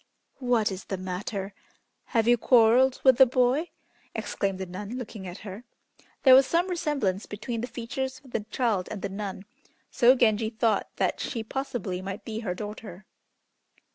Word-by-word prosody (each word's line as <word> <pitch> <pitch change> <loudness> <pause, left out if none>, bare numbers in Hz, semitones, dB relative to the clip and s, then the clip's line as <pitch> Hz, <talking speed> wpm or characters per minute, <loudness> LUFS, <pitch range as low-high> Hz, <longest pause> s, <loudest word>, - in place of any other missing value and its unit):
"What 240 -5 +2
is 190 0 -6
the 195 - -4
matter? 190 +2 -4 0.5
Have 225 -2 +1
you 240 - +6
quarrelled 245 +2 +4
with 260 -2 +6
the 265 - +8
boy?" 255 +6 +2 0.5
exclaimed 195 -2 -2
the 190 - -4
nun, 205 +6 -6
looking 215 -6 -7
at 175 +2 -7
her. 200 +3 -7 0.6
There 260 - +8
was 260 0 +7
some 345 +2 +2
resemblance 275 - -1
between 225 +2 -4
the 245 - -3
features 260 +3 -4
of 260 - -16
the - - 0
child 220 -8 0
and 210 - -6
the 200 - -2
nun, 195 -1 -6 0.5
so 250 0 +5
Genji 220 -3 +2
thought 225 -2 0
that - - 0
she 230 -5 -3
possibly 220 -7 -4
might 195 +2 -6
be 220 -1 -4
her 190 -6 -3
daughter. 210 -1 -8
225 Hz, 170 wpm, -27 LUFS, 195-250 Hz, 0.6 s, the